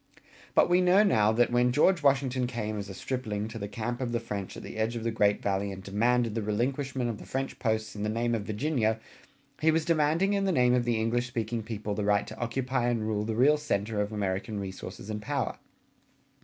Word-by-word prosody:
But - - +6
we 180 +1 +4
know 185 +3 +5
now 110 - +4
that 120 +2 +2
when 120 0 +3
George 170 +6 +3
Washington 135 -3 +2
came 110 -3 -3
as 100 0 -6
a - - -6
stripling 110 -3 -3
to 115 0 -7
the 100 - -4
camp 120 +4 -4
of 120 -2 -2
the 120 - +1
French 100 -4 -5
at - - -8
the - - -8
edge 110 +2 0
of 115 - -4
the 115 - 0
great 105 -2 +2
Valley 100 0 0
and 95 0 -8
demanded 115 +3 +1
the 115 - -1
relinquishment 130 +4 -1
of 115 -3 -4
the - - -10
French 135 0 -3
posts 110 -2 -1
in 105 - -5
the 105 - 0
name 120 +2 0
of 115 - 0
Virginia, 110 +1 0 0.6
he 160 - +3
was 160 0 +2
demanding 165 +4 +2
in 200 -1 +1
the 190 - +2
name 125 -6 +4
of 125 -1 +2
the 120 -2 +1
English 120 +2 0
speaking 115 -1 -2
people 105 -1 -4
the 105 - -2
right 100 0 +2
to 110 - -10
occupy 125 +1 -1
and 120 -2 0
rule 105 -1 -1
the 110 0 -2
real 140 +6 +5
center 105 -7 -1
of 105 +1 -2
American 100 0 -2
resources 95 +1 -7
and 105 0 -4
power. 105 - -2
115 Hz, 230 wpm, -29 LUFS, 105-130 Hz, 0.6 s, But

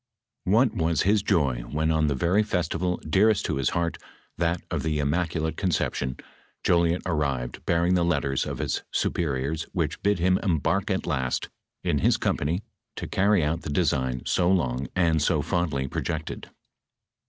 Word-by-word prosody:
What 110 +5 +3
was 85 -5 +1
his 105 +2 +3
joy 75 - +1
when 80 +5 -1
on 80 -1 +2
the 70 - +1
very 85 +10 +2
festival 90 -3 -1
dearest 100 +6 +3
to - - -1
his 70 -2 +1
heart, 85 -1 -1 0.4
that 85 0 0
of - - -1
the 80 -1 -1
Immaculate 80 +2 -1
Concep 90 -4 0
tion, 65 -1 -3 0.5
Jolliet 85 0 +2
arrived 70 -8 -2
bearing 85 +1 +2
the 90 -1 +3
letters 70 -6 0
of - - -4
his - - -1
superiors 75 0 -1
which - - -2
bid 100 0 +2
him 90 +2 +2
embark 85 -6 0
at - - -1
last, 65 -2 -1 0.3
in - - +1
his - - +3
company 85 +8 -1 0.3
to - - -5
carry 100 -2 +2
out 80 +3 -1
the - - -6
de 85 +5 +1
sign 65 -4 -1
so 90 -1 +2
long, 70 -8 +1
and 85 -4 +2
so 75 -1 +2
fondly 75 -7 -1
projected. 80 +3 -4
80 Hz, 165 wpm, -26 LUFS, 75-90 Hz, 0.5 s, What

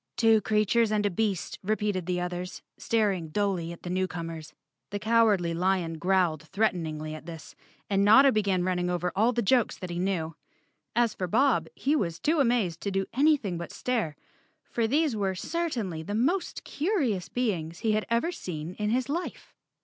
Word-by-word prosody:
"Two 225 -2 +5
creatures 215 +2 +2
and 210 -1 +1
a 205 - +1
beast," 195 -1 -2
repeated 205 -3 -1
the 180 -1 0
others, 180 0 -5
staring 200 -7 0
dully 185 -2 -1
at 170 - -11
the 175 - -5
newcomers. 170 -4 -3 0.4
The 205 - -3
Cowardly 215 -6 +3
Lion 175 -2 0
growled 180 -4 +2
threateningly 160 -4 -1
at 155 +1 -9
this 165 -2 -9 0.3
and 200 -1 +2
Notta 265 +7 +7
began 200 -5 +1
running 180 -1 0
over 180 0 -1
all 220 +5 +3
the 240 -1 -1
jokes 235 +3 +2
that 180 -2 -6
he 175 - -3
knew. 175 -4 -1 0.6
As 235 -2 +3
for 185 - -3
Bob, 225 - +2
he 285 +3 +1
was 170 - -1
too 315 +1 +1
amazed 235 - +1
to 200 - -2
do 195 0 0
anything 265 - +2
but 170 - -6
stare, 225 -12 -2 0.5
for 230 -1 -1
these 290 +1 +2
were 195 -3 -1
certainly 230 - -2
the 205 +6 -4
most 340 - 0
curious 285 - -1
beings 175 -9 -2
he 220 - +2
had 215 0 0
ever 235 +9 +1
seen 170 - -6
in 210 0 0
his 250 +3 +1
life. 335 +5 -4
200 Hz, 175 wpm, -28 LUFS, 175-230 Hz, 0.6 s, Notta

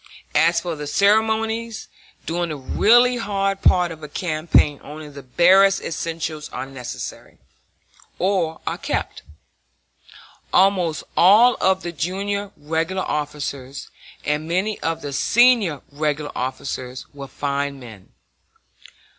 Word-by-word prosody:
As 165 +1 +4
for 170 -1 -4
the 150 -1 -6
ceremonies, 220 +4 +1 0.4
during 170 +1 -2
the 155 - -4
really 240 - +4
hard 195 -3 -1
part 180 -2 +3
of 160 -1 -9
a 150 - -7
campaign 155 -2 +1
only 150 +1 -9
the 140 -1 -10
barest 185 +9 +4
essentials 160 -2 -4
are - - -5 2.2
kept. - - -3 1.3
Almost 185 -4 +2
all 215 +8 +6
of 190 0 +2
the 175 - -4
junior 200 +5 -3
regular 165 +5 -2
officers, 140 -3 -4 0.3
and 150 +1 -1
many 190 +5 -1
of 165 0 -3
the 145 - -5
senior 225 - +3
regular 150 0 -2
officers, 130 0 -5
were 140 -1 -8
fine 140 0 -3
men. 110 -6 -13
165 Hz, 110 wpm, -21 LUFS, 145-195 Hz, 2.2 s, all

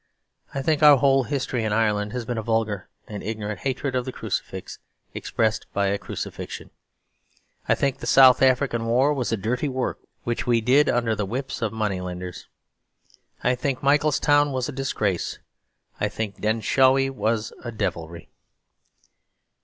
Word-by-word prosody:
I 135 - -2
think 155 +1 +1
our 150 -2 +8
whole 135 -1 +3
history 130 -3 -2
in 110 - -1
Ireland 105 -1 +1
has 125 -2 -3
been 120 -1 -2
a - - -2
vulgar 110 -4 -1 0.2
and 105 -2 -6
ignorant 105 -2 -4
hatred 135 0 -2
of 125 -1 0
the 130 - -5
crucifix, - - -5 0.3
expressed 110 -1 -1
by 100 -1 +1
a 100 +1 -1
crucifixion. - - -7 1.0
I - - +5
think 140 -2 -1
the - - -6
South 130 -2 +7
African 130 -3 +2
War 130 +5 +3
was 130 -5 -2
a 115 - +1
dirty 125 +8 -1
work 130 -1 -2 0.2
which 120 +1 -2
we 120 -1 +4
did 130 +6 +4
under 120 -2 +1
the 105 -2 -2
whips 130 +5 -4
of 110 -3 0
moneylenders. 90 -5 -4 1.0
I 125 - +3
think 130 +1 -2
Mitchelstown 145 0 +3
was 130 -2 -1
a - - -4
disgrace; 110 - -2 0.6
I - - 0
think 105 -2 -5
Denshawi 130 +5 +3
was 115 -4 -1
a 120 - -5
devilry. 85 -6 -4
120 Hz, 155 wpm, -24 LUFS, 110-135 Hz, 1.0 s, our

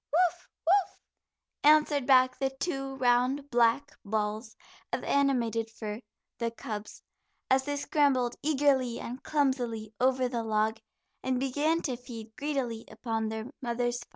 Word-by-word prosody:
"Woof, 355 +2 +1 0.2
woof," 380 +3 +2 0.6
answered 295 -2 +5
back 255 -1 +5
the 270 -1 +1
two 270 -4 -2
round 260 +3 +2
black 240 +4 +3
balls 215 +1 -2 0.4
of - - -2
animated 235 -5 +1
fur 215 0 -6 0.4
the 235 -1 0
cubs, 220 -2 -7 0.5
as 265 0 +4
they 290 - -1
scrambled 280 -4 +2
eagerly 270 -4 +2
and 250 +3 -6
clumsily 245 -7 0
over 255 0 +3
the 240 -2 -2
log, 220 0 0 0.4
and 255 -1 0
began 295 +5 +1
to 255 -5 -2
feed 230 -3 -10
greedily 270 -6 -2
upon 225 0 -2
their 220 0 -4 0.2
mother's 240 0 -1
find. 240 - -12
250 Hz, 135 wpm, -29 LUFS, 230-280 Hz, 0.6 s, answered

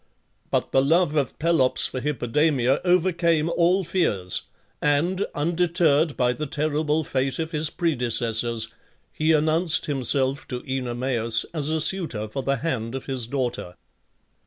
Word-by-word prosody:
But - - -1
the 135 - +4
love 160 +2 +2
of 140 -6 -1
Pelops 160 -5 +2
for 130 - -3
Hippodamia 140 -1 +1
overcame 170 -3 +2
all 180 +3 +2
fears, 105 - 0 0.4
and, 170 +7 +1
undeterred 165 -1 +1
by 125 -1 +2
the 150 +3 -5
terrible 150 +2 -1
fate 135 -1 -1
of 160 0 -3
his 155 -1 -1
predecessors, 120 -7 0 0.4
he 155 +1 +1
announced 155 +2 +2
himself 135 -1 +1
to 125 -1 -6
Oenomaus 120 -3 0
as 150 -2 -1
a 160 0 0
suitor 155 - 0
for 135 +6 -5
the 140 +1 0
hand 125 -5 -3
of 135 - -6
his 130 -4 -3
daughter. 120 -9 -3
145 Hz, 135 wpm, -24 LUFS, 125-160 Hz, 0.4 s, the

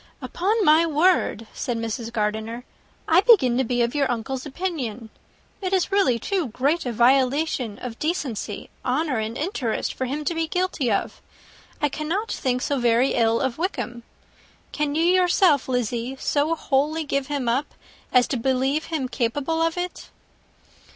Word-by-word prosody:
"Upon 410 +4 0
my 310 +2 +6
word," 325 - +2
said 240 -2 -3
Mrs. 230 0 -4
Gardiner, 220 +2 -2 0.4
"I 330 +3 +5
begin 385 - +5
to - - +3
be 245 0 +1
of 235 - -1
your 285 -2 +1
uncle's 250 +4 -4
opinion. 260 - -4 0.5
It 375 0 -2
is 380 0 +1
really 340 -12 +3
too 355 - -1
great 275 +7 0
a - - -1
violation 255 -1 +2
of 235 -3 -7
decency, 265 - -3
honour, 265 0 0
and 220 +2 -3
interest, 285 - -2
for 260 - -3
him 290 +4 -4
to 340 - 0
be 325 -1 -1
guilty 360 -8 -1
of 200 - -2 0.6
it. - - -17
I - - +1
cannot 335 +10 -3
think 250 -1 -1
so 285 -2 0
very 240 +2 +3
ill 230 -1 +2
of 265 0 -2
Wickham. 245 -9 -3 0.7
Can 300 -1 -1
you, 325 - +2
yourself, 355 -5 +3
Lizzie, 245 0 -1
so 300 +3 +1
wholly 305 +2 0
give 275 -2 -2
him 285 -4 -2
up, 260 +5 -1 0.4
as 250 -1 +4
to 265 - 0
believe 265 +5 0
him 310 -6 -2
capable 275 +6 -1
of 330 +1 0
it?" 355 0 -5
270 Hz, 165 wpm, -24 LUFS, 240-325 Hz, 0.7 s, my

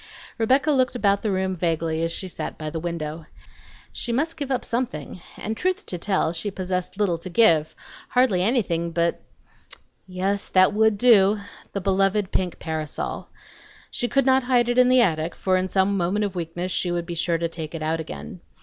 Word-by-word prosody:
Rebecca 265 +6 +3
looked 255 -3 +2
about 200 -4 +2
the 215 - -1
room 190 -1 0
vaguely 165 -2 -1
as 165 - -1
she 190 - -4
sat 180 - -6
by 155 -1 -5
the 160 - -3
window. 160 -2 -5 0.7
She 240 - -4
must 305 +8 0
give 285 -3 -5
up 255 -2 -1
something, 190 - -3 0.2
and 220 +1 -4
truth 370 - -1
to 180 - -5
tell 190 -3 0
she 175 +5 -3
possessed 185 -1 -3
little 185 -6 +1
to 180 +3 -7
give, 170 -6 +3 0.3
hardly 250 -8 +3
anything 185 -6 +1
but 170 0 0 0.9
yes, 190 +2 -2
that 185 +2 +5
would 220 0 +3
do, 210 -3 +5 0.3
the 200 - -2
beloved 195 +1 +1
pink 180 -2 -1
parasol. 155 -2 -4 0.6
She 240 - -1
could 275 +3 +2
not 265 0 +4
hide 245 -1 +2
it 245 +1 +2
in 250 0 +6
the 255 0 +6
attic, 160 -5 0
for 185 -1 +1
in 185 0 +1
some 190 +1 +1
moment 195 +3 0
of 200 - -4
weakness 175 +1 -4
she 180 - 0
would 175 -1 -2
be 170 - -5
sure 170 0 0
to 170 0 -1
take 165 -1 -7
it 160 - -4
out 160 +1 0
again. 75 - -7
190 Hz, 195 wpm, -24 LUFS, 170-225 Hz, 0.9 s, in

